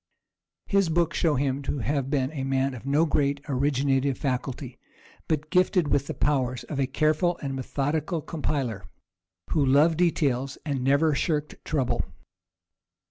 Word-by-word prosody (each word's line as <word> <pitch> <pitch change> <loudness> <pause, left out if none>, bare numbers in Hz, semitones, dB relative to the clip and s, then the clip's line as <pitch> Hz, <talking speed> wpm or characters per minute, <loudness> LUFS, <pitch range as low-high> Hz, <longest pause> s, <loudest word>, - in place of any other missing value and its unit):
His 195 -4 +2
books 170 0 +1
show 160 -3 +2
him 135 0 0
to 140 - -3
have 135 +3 -1
been 135 -2 0
a 140 -4 -4
man 135 0 0
of 125 +2 -9
no 145 +4 +3
great 140 -2 +1
originative 135 -1 +1
faculty, 130 -1 -3 0.5
but 155 0 -1
gifted 180 -3 +3
with 140 0 +1
the - - -4
powers 130 -4 0
of 140 - -5
a 135 - +2
careful 155 +5 +1
and 135 -1 -2
methodical 145 +5 -1
compiler, 135 - -3 0.7
who 150 - +2
loved 150 +5 +4
details 135 -7 +1
and 140 -4 -2
never 140 +4 +3
shirked 150 0 -1
trouble. 140 -5 0
140 Hz, 145 wpm, -26 LUFS, 135-155 Hz, 0.7 s, loved